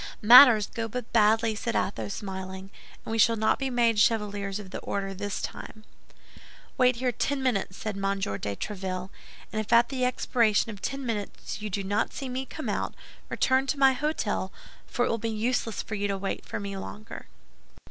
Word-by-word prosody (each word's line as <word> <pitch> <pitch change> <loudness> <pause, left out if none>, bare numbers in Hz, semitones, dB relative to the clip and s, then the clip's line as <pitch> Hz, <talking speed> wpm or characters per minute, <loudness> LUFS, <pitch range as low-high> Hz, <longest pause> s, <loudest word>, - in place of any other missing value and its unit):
"Matters 235 -2 +9
go 230 0 -4
but 245 +1 -6
badly," 220 0 +4
said 230 +2 -3
Athos, 200 0 -2
smiling; 190 -1 -7 0.3
"and - - -5
we 225 - -1
shall 230 +1 +5
not 220 0 +1
be 270 -1 -1
made 235 -3 +2
Chevaliers 205 -3 +1
of 200 -3 -9
the - - -5
Order 195 -1 -3
this 205 +1 -4
time." 215 - -7 0.9
"Wait 250 -1 +4
here 250 +1 0
ten 270 +3 -2
minutes," 200 -7 -1
said 215 -2 -4
M. 195 0 -1
de 100 - -3
Tréville; 185 - -5 0.4
"and 215 - -1
if 215 0 -4
at 235 0 +5
the 260 -2 -2
expiration 230 -3 +2
of 200 -3 -11
ten 275 -1 -4
minutes 215 -2 -5
you 215 - -4
do 200 0 -2
not 205 +2 -1
see 270 - -5
me 260 +1 -4
come - - -7
out, - - -2 0.3
return 265 +1 +1
to 290 - -1
my 270 -1 +5
hôtel, 255 -9 -2 0.4
for 245 - 0
it - - -1
will 230 - -1
be 230 +1 -2
useless 225 +1 -1
for 220 - -8
you 205 -1 -1
to 200 -1 -2
wait 195 0 -4
for - - -4
me 200 -1 -5
longer." 210 +3 -8
215 Hz, 195 wpm, -27 LUFS, 200-245 Hz, 0.9 s, Matters